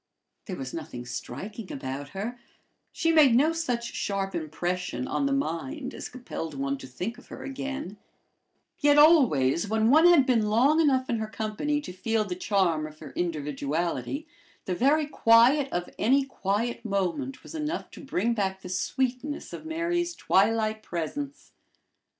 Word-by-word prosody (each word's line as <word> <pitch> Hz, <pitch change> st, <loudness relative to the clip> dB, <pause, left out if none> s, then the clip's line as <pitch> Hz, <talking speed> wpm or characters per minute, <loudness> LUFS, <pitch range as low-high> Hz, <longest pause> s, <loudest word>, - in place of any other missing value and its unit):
There 190 Hz, -, -4 dB
was 130 Hz, -5 st, -6 dB
nothing 145 Hz, -7 st, -6 dB
striking 185 Hz, -, -6 dB
about 135 Hz, +1 st, -5 dB
her; 220 Hz, +9 st, -5 dB, 0.5 s
she 330 Hz, -, +1 dB
made 295 Hz, -7 st, +6 dB
no 300 Hz, +6 st, +4 dB
such 245 Hz, -8 st, -2 dB
sharp 195 Hz, -1 st, -2 dB
impression 170 Hz, -4 st, -3 dB
on 280 Hz, -, 0 dB
the -, -, -1 dB
mind 275 Hz, -, -2 dB
as -, -, -7 dB
compelled 200 Hz, -, -6 dB
one 140 Hz, 0 st, -2 dB
to 130 Hz, -, -9 dB
think 190 Hz, -, -5 dB
of -, -, -18 dB
her -, -, -9 dB
again; 270 Hz, -5 st, -5 dB, 0.8 s
yet 290 Hz, 0 st, +4 dB
always, 220 Hz, -, +5 dB
when 220 Hz, +2 st, +2 dB
one 315 Hz, +4 st, +7 dB
had 335 Hz, -7 st, +6 dB
been 230 Hz, -5 st, +2 dB
long 265 Hz, +9 st, +4 dB
enough 260 Hz, -4 st, +2 dB
in 230 Hz, -, 0 dB
her 220 Hz, -, -2 dB
company 220 Hz, +8 st, -2 dB
to 180 Hz, -, -8 dB
feel 220 Hz, +4 st, 0 dB
the 185 Hz, -, -3 dB
charm 180 Hz, -5 st, +1 dB
of 155 Hz, 0 st, -13 dB
her 155 Hz, -3 st, -10 dB
individuality, 165 Hz, -, -2 dB, 0.4 s
the 185 Hz, -, -1 dB
very 285 Hz, -, +3 dB
quiet 265 Hz, +1 st, +4 dB
of 175 Hz, 0 st, -2 dB
any 270 Hz, +4 st, +3 dB
quiet 230 Hz, -1 st, -2 dB
moment 220 Hz, +6 st, -2 dB
was -, -, -11 dB
enough 315 Hz, +2 st, -3 dB
to -, -, -11 dB
bring 235 Hz, -4 st, 0 dB
back 190 Hz, -3 st, -1 dB
the 180 Hz, -, -7 dB
sweetness 260 Hz, +9 st, -2 dB
of 315 Hz, -, -7 dB
Mary's 340 Hz, +1 st, -1 dB
twilight 215 Hz, +2 st, +2 dB
presence. 280 Hz, -, -5 dB
225 Hz, 160 wpm, -27 LUFS, 180-280 Hz, 0.8 s, one